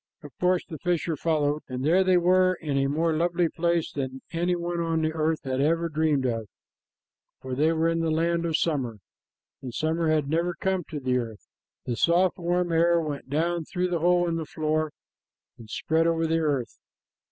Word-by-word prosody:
Of 145 Hz, -, -10 dB
course 180 Hz, 0 st, +2 dB
the 160 Hz, -5 st, -8 dB
fisher 170 Hz, -1 st, 0 dB
followed, 150 Hz, -1 st, 0 dB
and 130 Hz, +1 st, -3 dB
there 180 Hz, +5 st, +4 dB
they 185 Hz, -1 st, +4 dB
were 185 Hz, +1 st, +4 dB
in 150 Hz, -5 st, -4 dB
a 135 Hz, 0 st, +2 dB
more 160 Hz, +3 st, +1 dB
lovely 170 Hz, +1 st, +1 dB
place 170 Hz, -1 st, 0 dB
than 130 Hz, -1 st, -5 dB
any 175 Hz, +1 st, 0 dB
one 175 Hz, 0 st, -3 dB
on 165 Hz, -1 st, 0 dB
the 155 Hz, 0 st, 0 dB
earth 160 Hz, 0 st, 0 dB
had 130 Hz, 0 st, -1 dB
ever 165 Hz, +3 st, +1 dB
dreamed 155 Hz, -3 st, +1 dB
of, 115 Hz, -3 st, -2 dB, 0.9 s
for 130 Hz, -1 st, -6 dB
they 150 Hz, +5 st, +2 dB
were 165 Hz, 0 st, +1 dB
in 165 Hz, 0 st, +1 dB
the 165 Hz, -1 st, 0 dB
land 170 Hz, +2 st, +1 dB
of 160 Hz, -1 st, +1 dB
summer, 135 Hz, -9 st, -1 dB, 0.6 s
and 130 Hz, -, -6 dB
summer 160 Hz, +5 st, 0 dB
had 155 Hz, -3 st, +1 dB
never 170 Hz, +3 st, 0 dB
come 190 Hz, -1 st, -1 dB
to 150 Hz, -, -6 dB
the 125 Hz, -2 st, +1 dB
earth. 115 Hz, -3 st, -7 dB, 0.4 s
The 120 Hz, -, -2 dB
soft, 175 Hz, +7 st, +2 dB
warm 175 Hz, 0 st, 0 dB
air 170 Hz, +1 st, +4 dB
went 150 Hz, -4 st, -5 dB
down 165 Hz, +3 st, 0 dB
through 180 Hz, +2 st, -2 dB
the 175 Hz, -2 st, 0 dB
hole 175 Hz, +1 st, +3 dB
in 165 Hz, -1 st, -1 dB
the 160 Hz, -, -3 dB
floor 155 Hz, 0 st, -1 dB, 0.7 s
and 110 Hz, -2 st, -12 dB
spread 160 Hz, +8 st, +1 dB
over 165 Hz, 0 st, +1 dB
the 165 Hz, 0 st, +1 dB
earth. 140 Hz, -7 st, -1 dB
160 Hz, 200 wpm, -26 LUFS, 145-170 Hz, 0.9 s, there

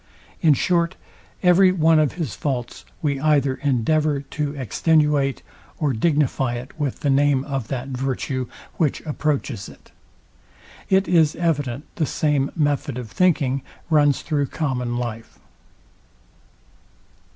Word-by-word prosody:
In 155 Hz, -4 st, +5 dB
short, 170 Hz, +3 st, +1 dB, 0.5 s
every 185 Hz, +1 st, +6 dB
one 165 Hz, -3 st, +4 dB
of 150 Hz, -2 st, +2 dB
his 160 Hz, -, -4 dB
faults 125 Hz, +2 st, -4 dB, 0.2 s
we 140 Hz, -2 st, 0 dB
either 140 Hz, -3 st, +2 dB
endeavour 145 Hz, +2 st, +1 dB
to 145 Hz, +1 st, -4 dB
extenuate, 145 Hz, +1 st, +1 dB, 0.3 s
or 145 Hz, -4 st, 0 dB
dignify 135 Hz, -1 st, +1 dB
it 125 Hz, +3 st, -7 dB
with 145 Hz, -4 st, -2 dB
the 145 Hz, -, 0 dB
name 140 Hz, -1 st, +3 dB
of 135 Hz, -5 st, -4 dB
that 130 Hz, +1 st, -4 dB
virtue, 130 Hz, 0 st, -2 dB, 0.3 s
which 155 Hz, -5 st, 0 dB
approaches 145 Hz, -8 st, -2 dB
it. -, -, -17 dB, 1.0 s
It 190 Hz, 0 st, +3 dB
is 165 Hz, -3 st, +3 dB
evident 145 Hz, -6 st, -1 dB
the 155 Hz, -, +1 dB
same 145 Hz, -3 st, +1 dB
method 145 Hz, -3 st, 0 dB
of 120 Hz, -4 st, -7 dB
thinking 140 Hz, -, +2 dB, 0.3 s
runs 145 Hz, -2 st, +3 dB
through 145 Hz, -3 st, 0 dB
common 125 Hz, -5 st, -2 dB
life. 115 Hz, -2 st, -5 dB
145 Hz, 125 wpm, -22 LUFS, 130-155 Hz, 1.0 s, every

